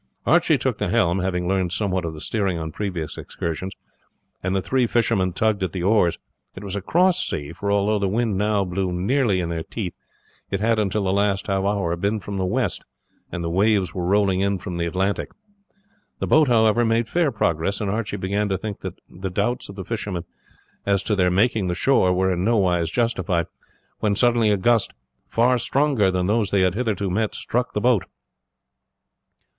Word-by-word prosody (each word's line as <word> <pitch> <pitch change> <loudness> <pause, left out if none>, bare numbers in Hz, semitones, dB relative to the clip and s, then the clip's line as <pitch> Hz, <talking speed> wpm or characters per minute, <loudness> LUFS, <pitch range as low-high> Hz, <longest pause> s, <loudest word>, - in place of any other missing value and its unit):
Archie - - +4
took - - -2
the - - 0
helm, 90 +2 +2
having 90 -1 -1
learned 95 -2 0
somewhat 95 -2 -1
of 80 -1 -4
the 75 - -9
steering 100 -5 -1
on 80 -1 -4
previous 90 -5 -4
excursions, 85 +3 -4 0.7
and 95 +1 -1
the - - +2
three 130 -2 +1
fishermen 110 -6 +1
tugged 105 +2 0
at 95 -4 -2
the 90 - -3
oars. 95 -3 +3 0.4
It 95 - -8
was 100 -1 -4
a 100 - -2
cross 180 - +2
sea, 75 +1 -4
for 100 +4 -3
although 100 +1 +2
the 100 - 0
wind 110 +1 0
now 105 0 +1
blew 90 +1 -2
nearly 100 +3 +1
in 85 -2 -2
their 85 -1 -2
teeth, 95 +1 -5 0.5
it 100 - -1
had 115 +1 +2
until 105 0 0
the 95 0 +1
last 100 -1 +1
half 95 -1 0
hour 100 -4 0
been 100 +5 -1
from 100 +1 -6
the 95 -1 0
west, 125 +6 -1 0.5
and 85 - -4
the 85 - -2
waves 100 +1 +2
were 90 -1 -3
rolling 100 -1 +2
in 100 0 +1
from 90 -1 -6
the 85 0 -1
Atlantic. 95 +3 -1 0.9
The - - -2
boat, 155 -1 +4
however, 115 -1 +4
made 115 0 +1
fair 170 -1 +1
progress, 90 -2 0
and 105 - -2
Archie 110 -1 -2
began 100 +2 -1
to 95 - 0
think 105 +1 -6
that - - -7
the 95 +2 -6
doubts 105 +7 -1
of 100 - -9
the 95 -2 -7
fishermen 100 -6 -3 0.6
as 100 -1 +1
to 105 - 0
their 90 -2 +3
making 105 +2 +2
the 90 - -1
shore 95 -8 +3
were 95 +1 +2
in 90 0 -2
no 115 +3 +2
wise 90 -4 +1
justified, 105 -6 0 0.5
when 105 -2 +1
suddenly 120 -1 +3
a 105 - +3
gust, 115 +2 +2 0.3
far 120 +2 +2
stronger 135 -5 +2
than 90 -1 0
those 105 +1 +1
they 100 - +2
had 95 -1 +3
hitherto 105 -4 -1
met, 110 +3 -1
struck 125 +1 -2
the - - 0
boat. 120 -4 +3
100 Hz, 200 wpm, -23 LUFS, 90-110 Hz, 0.9 s, Archie